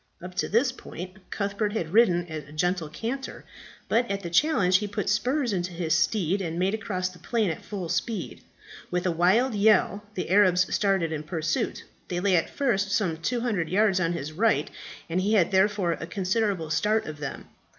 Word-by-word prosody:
Up 180 +1 -9
to - - 0
this 245 +5 +3
point 185 -6 -9
Cuthbert 205 +1 -2
had 170 -6 -3
ridden 180 -6 +4
at 155 -4 -7
a - - -13
gentle 175 +1 -1
canter; 240 - -5 0.4
but 240 +1 +1
at 200 0 -2
the 170 - -5
challenge 185 - +4
he 210 - -3
put 205 0 -3
spurs 245 +3 +1
into 180 -1 -2
his 165 -2 -1
steed 185 +3 +1
and 165 -2 -3
made 185 +3 +1
across 185 -5 -2
the 180 -1 -15
plain 220 -6 0
at 160 - -7
full 195 -5 -5
speed. 190 +6 -3 0.5
With 180 0 -1
a 180 - +2
wild 190 +10 +3
yell 205 -1 +3
the 180 - -3
Arabs 185 -3 +4
started 195 -5 +1
in 155 -2 -3
pursuit. 155 0 -2 0.2
They 175 - -2
lay 190 0 +2
at 165 - +1
first 210 -8 0
some 195 -6 0
200 215 -2 -1
yards 195 0 +3
on 170 -1 +1
his 155 -2 -4
right, 160 -4 +1 0.4
and 175 +3 0
he 205 +3 +1
had 195 -4 +3
therefore 190 -2 +2
a 165 0 -4
considerable 190 -2 -1
start 215 +6 +1
of 155 -1 -7
them. 145 -2 -6
185 Hz, 190 wpm, -26 LUFS, 170-210 Hz, 0.5 s, ridden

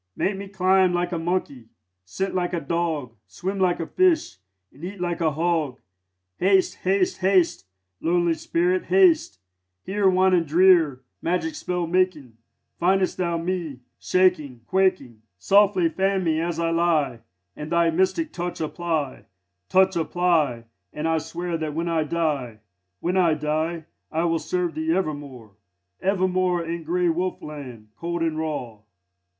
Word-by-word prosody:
Make 195 - 0
me 200 0 -7
climb 190 -1 +3
like 175 0 -1
a 170 - -2
monkey, 165 -8 -3 0.4
scent 190 - -3
like 180 -1 -1
a 170 - 0
dog, 160 -6 -2
Swim 185 - -4
like 180 -2 +2
a 165 - -2
fish, 350 - +1 0.4
and 145 - -16
eat 190 +2 -6
like 175 -1 -2
a 160 - +3
hog. 160 -4 -1 0.6
Haste, 190 0 +3
haste, 190 0 0
haste, 185 - +2 0.3
lonely 175 0 +2
spirit, 175 +3 0
haste! 180 - +4 0.5
Here, 195 0 +2
wan 185 0 +3
and 170 -3 +2
drear, 165 -5 +4 0.2
magic 180 - -1
spell 180 - -2
making, 165 -8 0 0.4
Findest 185 +1 +2
thou 170 -2 0
me 165 -6 -3 0.2
shaking, 165 -10 +1
quaking. 185 - 0 0.2
Softly 195 - +4
fan 190 +3 0
me 160 -2 +1
as 170 -1 -2
I 165 0 0
lie, 160 -7 +1 0.4
And 150 +1 -7
thy 170 -1 +3
mystic 190 - 0
touch 175 0 -4
apply 160 -3 -3 0.4
Touch 190 0 +4
apply, 160 -7 +1 0.3
and 150 +2 -3
I 165 0 +2
swear 170 +2 -4
that 155 -2 -4
when 165 +1 -2
I 165 -2 0
die, 145 -9 -2 0.4
When 180 +2 0
I 170 -4 +4
die, 155 +2 -2 0.3
I 160 +1 0
will 165 -1 +1
serve 180 -1 -2
thee 160 +1 -1
evermore, 145 - -4 0.5
Evermore, 185 -2 +1
in 165 0 -5
grey 175 +2 +1
wolf 180 +3 -1
land, 125 -8 -9
cold 170 +2 -3
and 160 -1 -1
raw." 135 -9 -4
170 Hz, 150 wpm, -24 LUFS, 155-185 Hz, 0.6 s, haste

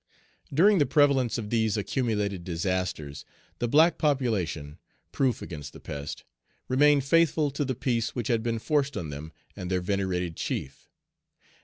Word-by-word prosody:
During 190 +7 +5
the 145 - +3
prevalence 140 -3 +3
of 105 -3 -5
these 110 -2 +1
accumulated 105 -4 -1
disasters, 85 -5 -3 0.4
the 120 - 0
black 160 +7 +4
population, 100 - -1 0.3
proof 130 -3 0
against 75 -5 -8
the - - -11
pest, 70 0 -6 0.4
remained 145 +2 +4
faithful 155 -1 +3
to 140 +2 -2
the 130 -2 -2
peace 120 -3 -1
which 120 -4 -2
had 115 -2 +1
been 115 0 -1
forced 145 +2 0
on 80 -3 -4
them 75 +3 -7 0.2
and 90 - -6
their 90 -1 +1
venerated 90 -3 -1
chief. 70 -3 -5
115 Hz, 150 wpm, -27 LUFS, 90-140 Hz, 0.4 s, During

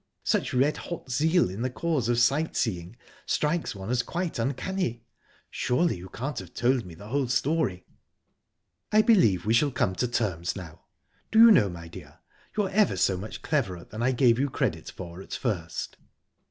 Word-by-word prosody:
Such - - 0
red 135 +4 +2
hot 170 -6 -7
zeal 160 +7 +3
in 95 +5 -6
the 130 - 0
cause 140 -3 -1
of 120 - +2
sight 140 +7 +2
seeing 90 -3 -2 0.3
strikes 155 -4 0
one 95 +3 -5
as 125 -1 +2
quite 170 0 -3
uncanny! 130 0 -2 0.5
Surely 165 +7 +1
you 90 +2 -10
can't 135 +2 -4
have - - -11
told 120 -4 +1
me 85 - -10
the 100 +5 -11
whole 135 +1 0
story?" 125 - 0 1.1
"I 215 0 +5
believe 115 - +4
we 110 - +2
shall 145 +5 +4
come 95 -7 0
to 125 - +1
terms 100 -8 -1
now. 85 -4 -10 0.5
Do 220 - +1
you 230 0 +10
know, 135 - +5
my 85 -1 -8
dear, 85 - -12 0.4
you're 200 -3 +1
ever 205 0 +3
so 95 - +2
much 100 +4 -7
cleverer 105 - -1
than 110 - -8
I 130 +2 +2
gave 125 -2 +3
you 140 +1 +1
credit - - -2
for 85 0 -9
at - - -10
first." 95 -10 -3
120 Hz, 180 wpm, -27 LUFS, 95-155 Hz, 1.1 s, you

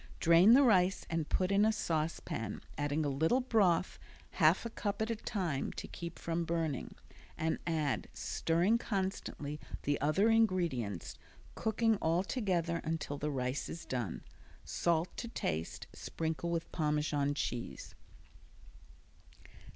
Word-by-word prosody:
Drain 170 +6 +7
the 280 - +7
rice 190 -6 +4
and 165 -2 -1
put 185 +1 +1
in 200 +1 +4
a 220 - +5
saucepan, 155 - -2
adding 145 +1 0
a - - +1
little 160 - +2
broth, 210 -9 +2 0.3
half 165 +7 +4
a 230 - -4
cup 205 -2 -3
at 220 +1 0
a - - 0
time, 180 - -2
to - - -6
keep 170 -1 -7
from 170 0 -2
burning, 165 -5 -2 0.4
and 160 0 0
add, 155 -5 0
stirring 175 +8 +1
constantly, 190 -8 -3 0.2
the 145 0 0
other 155 +9 +3
ingredients, 170 - +1 0.4
cooking 225 0 +1
all 170 +1 +1
together 180 -7 0
until 155 -3 -3
the 150 - -1
rice 130 -1 -2
is 170 - -7
done. 120 -8 -3 0.4
Salt 170 0 0
to 235 - -4
taste; 80 - -3
sprinkle 160 +1 -3
with 165 -1 -2
Parmesan 150 -2 0
cheese. 120 - -4
165 Hz, 135 wpm, -33 LUFS, 150-195 Hz, 0.4 s, Drain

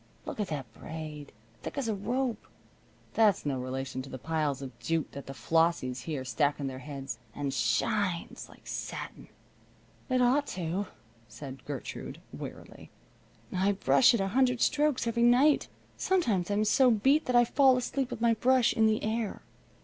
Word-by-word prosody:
Look - - -6
at 210 - 0
that 135 -8 -5
braid! 155 -1 -8 0.3
Thick - - -7
as 275 -4 -1
a 220 - +1
rope! 240 +4 -2 0.7
That's 215 -8 +3
no 135 -3 -1
relation 130 +1 -4
to 135 - -10
the 130 - -6
piles 150 -1 -1
of 130 -3 -9
jute 165 -1 -1
that 140 - -9
the 135 - -7
Flossies 160 -6 +1
here 145 -5 -3
stack 145 +2 +1
on 140 - -3
their 130 -1 -4
heads. 135 -1 -6 0.2
And 140 -2 -2
shines! 170 - -1
Like - - -18
satin." - - -6 0.8
"It 255 0 +2
ought 265 +4 +3
to," 180 +3 -2 0.4
said 135 -1 -9
Gertrude, 140 -3 -6
wearily. - - -9 0.7
"I 195 +2 +2
brush 235 +5 +5
it - - 0
a 195 0 0
hundred 250 +2 +2
strokes 295 -4 +2
every 235 0 0
night. 250 +5 +5 0.3
Sometimes 225 - +1
I'm 205 +1 +1
so 255 +4 +5
beat 265 +8 +3
that 250 - 0
I 240 0 +7
fall 265 +1 +4
asleep 255 +1 -2
with - - -6
my 235 -1 +4
brush 250 +2 +3
in 220 0 +4
the 220 0 +1
air. 220 -1 -2
195 Hz, 170 wpm, -30 LUFS, -, 0.8 s, I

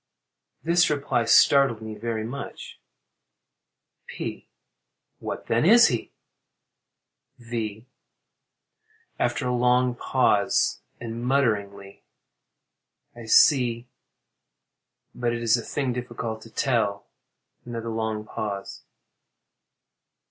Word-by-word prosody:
[This 170 +2 +3
reply 140 -5 0
startled 135 0 +5
me 110 -1 -7
very 110 +1 -4
much.] 125 +5 -8 1.3
P. - - -7 0.7
What, - - -6
then, 115 +1 +1
is 230 +7 +7
he? 120 -3 -3 1.3
V. 115 -2 -5 1.3
[After - - -1
a 125 - 0
long 125 +1 +2
pause, 120 -5 +1 0.2
and 115 0 -6
mutteringly.] 100 -7 -1 1.1
I 120 -1 -10
see—but 120 -1 -1
it 120 0 -4
is 115 -1 +4
a 120 - -2
thing 130 +2 -2
difficult 120 -2 -5
to 115 - -13
tell. 110 -5 -1 0.6
[_Another 115 -1 -5
long 110 -1 -3
pause. 100 -2 -6
115 Hz, 90 wpm, -25 LUFS, 110-125 Hz, 1.3 s, is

